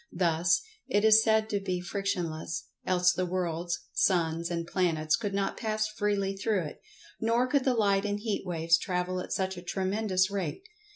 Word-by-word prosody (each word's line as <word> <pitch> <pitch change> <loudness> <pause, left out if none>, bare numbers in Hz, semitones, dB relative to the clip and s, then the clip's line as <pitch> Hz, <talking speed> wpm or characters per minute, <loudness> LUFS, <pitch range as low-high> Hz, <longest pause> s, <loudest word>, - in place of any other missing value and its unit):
Thus, 175 +1 +2 0.2
it 205 +1 +2
is 220 0 +7
said 220 -1 +3
to 205 - +1
be 185 -2 -2
frictionless, 175 -4 -3 0.2
else 180 -1 +4
the 185 - -1
worlds, 175 -1 -2
suns 170 -2 +1
and 170 -1 -2
planets 160 -4 +1
could 200 +5 -3
not 195 0 -1
pass 215 -1 -1
freely 205 -2 -1
through 195 -1 0
it, 150 - -8 0.4
nor 230 +2 +2
could 260 +1 +1
the 260 -2 +3
light 200 -3 +2
and 205 0 -1
heat 215 -1 -2
waves 165 -2 +2
travel 180 0 -2
at - - -6
such 190 -1 -1
a - - -6
tremendous 190 +1 0
rate. 180 -6 -3
185 Hz, 175 wpm, -29 LUFS, 175-205 Hz, 0.4 s, is